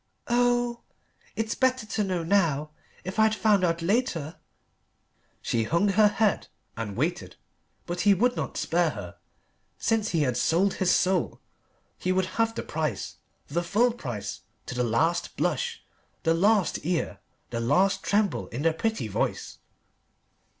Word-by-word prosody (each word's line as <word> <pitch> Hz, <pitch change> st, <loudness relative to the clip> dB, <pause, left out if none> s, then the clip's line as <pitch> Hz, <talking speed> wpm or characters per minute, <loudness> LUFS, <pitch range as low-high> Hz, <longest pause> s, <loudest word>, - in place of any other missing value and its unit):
Oh 240 Hz, 0 st, +2 dB, 0.5 s
it's 225 Hz, 0 st, -1 dB
better 260 Hz, -3 st, +1 dB
to 215 Hz, 0 st, -1 dB
know 185 Hz, -3 st, -1 dB
now. 160 Hz, -5 st, +1 dB, 0.3 s
If 190 Hz, +4 st, -5 dB
I'd 220 Hz, 0 st, +4 dB
found 210 Hz, -3 st, +3 dB
out 165 Hz, -1 st, +1 dB
later 175 Hz, -, 0 dB, 0.5 s
" -, -, -43 dB
She 115 Hz, -, 0 dB
hung 170 Hz, -, +2 dB
her 210 Hz, +2 st, +5 dB
head 210 Hz, -1 st, +1 dB, 0.3 s
and 110 Hz, -3 st, -5 dB
waited. -, -, -2 dB, 0.5 s
But 175 Hz, 0 st, -3 dB
he 205 Hz, -1 st, +5 dB
would 245 Hz, +6 st, +2 dB
not -, -, -4 dB
spare -, -, +1 dB
her. -, -, -8 dB, 0.6 s
Since 225 Hz, -2 st, 0 dB
he 165 Hz, -3 st, +1 dB
had 125 Hz, -3 st, 0 dB
sold 185 Hz, +8 st, +2 dB
his 185 Hz, -, 0 dB
soul 185 Hz, -1 st, +2 dB, 0.6 s
he 185 Hz, -, 0 dB
would 185 Hz, 0 st, +2 dB, 0.2 s
have 225 Hz, 0 st, +1 dB
the -, -, -3 dB
price: 150 Hz, -9 st, -3 dB, 0.3 s
the 170 Hz, +4 st, -1 dB
full 225 Hz, +8 st, +2 dB
price, 120 Hz, -, -6 dB, 0.2 s
to -, -, -6 dB
the 125 Hz, 0 st, 0 dB
last 165 Hz, +9 st, 0 dB
blush, 475 Hz, -2 st, -1 dB, 0.4 s
the 165 Hz, -2 st, +3 dB
last 200 Hz, +3 st, +2 dB
tear, 170 Hz, +1 st, -2 dB, 0.3 s
the 115 Hz, -, -2 dB
last 190 Hz, +11 st, +2 dB
tremble 205 Hz, -1 st, 0 dB
in 125 Hz, +5 st, -5 dB
the 165 Hz, -1 st, +3 dB
pretty 220 Hz, -, -2 dB
voice. 100 Hz, -, -3 dB
185 Hz, 150 wpm, -27 LUFS, 160-220 Hz, 0.6 s, her